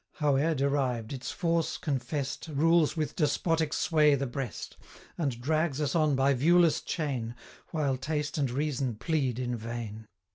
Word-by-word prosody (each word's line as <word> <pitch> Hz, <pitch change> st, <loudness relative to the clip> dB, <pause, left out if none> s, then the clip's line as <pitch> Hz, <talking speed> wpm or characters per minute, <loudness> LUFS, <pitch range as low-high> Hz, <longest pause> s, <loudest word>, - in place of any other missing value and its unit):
Howe'er 150 Hz, +1 st, +2 dB
derived, 135 Hz, -4 st, 0 dB
its 125 Hz, -2 st, -5 dB
force 170 Hz, -2 st, 0 dB
confest 140 Hz, +1 st, -3 dB
125 150 Hz, -3 st, -6 dB
Rules 165 Hz, +1 st, +3 dB
with 155 Hz, -1 st, -2 dB
despotic 160 Hz, 0 st, +1 dB
sway 150 Hz, -3 st, +3 dB
the 140 Hz, 0 st, -1 dB
breast, 125 Hz, -, -5 dB, 0.4 s
And 140 Hz, -8 st, -2 dB
drags 155 Hz, +2 st, 0 dB
us 145 Hz, -3 st, 0 dB
on 155 Hz, -4 st, +3 dB
by 135 Hz, +1 st, +3 dB
viewless 165 Hz, +5 st, +4 dB
chain, 130 Hz, -8 st, -3 dB, 0.3 s
While 145 Hz, -5 st, 0 dB
taste 150 Hz, +2 st, -2 dB
and 140 Hz, -3 st, +1 dB
reason 135 Hz, -2 st, -1 dB
plead 130 Hz, 0 st, -1 dB
in 125 Hz, -1 st, -2 dB
vain. 110 Hz, -1 st, -6 dB
140 Hz, 150 wpm, -29 LUFS, 125-155 Hz, 0.4 s, viewless